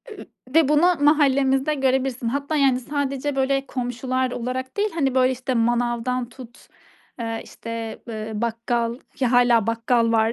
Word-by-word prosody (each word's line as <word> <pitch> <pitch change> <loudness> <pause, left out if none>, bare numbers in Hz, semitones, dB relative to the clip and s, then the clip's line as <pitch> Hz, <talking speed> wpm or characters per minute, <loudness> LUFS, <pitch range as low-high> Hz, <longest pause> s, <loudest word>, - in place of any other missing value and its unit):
Eee, 425 - -10 0.3
ve 320 -4 +5
bunu 325 +5 +4
mahallemizde 280 -1 +3
görebilirsin. 265 -3 0
Hatta 280 +4 -2
yani, 270 -3 +3
sadece, 280 +1 -2
böyle, 270 0 +1
komşular 255 0 -2
olarak 255 - -4
değil, 415 +1 +1
hani 275 -5 0
böyle 255 0 +3
işte, 255 0 -3
manavdan 240 +1 0
tut, 245 -1 -14 0.5
eee, 225 -1 -3
işte, 230 -1 -7
eee, 220 -1 -5
bakkal 230 +1 -1 0.2
ki 260 - +1
hâlâ 240 -3 +4
bakkal 230 0 +1
var. 225 0 +3
255 Hz, 145 wpm, -23 LUFS, 235-270 Hz, 0.5 s, ve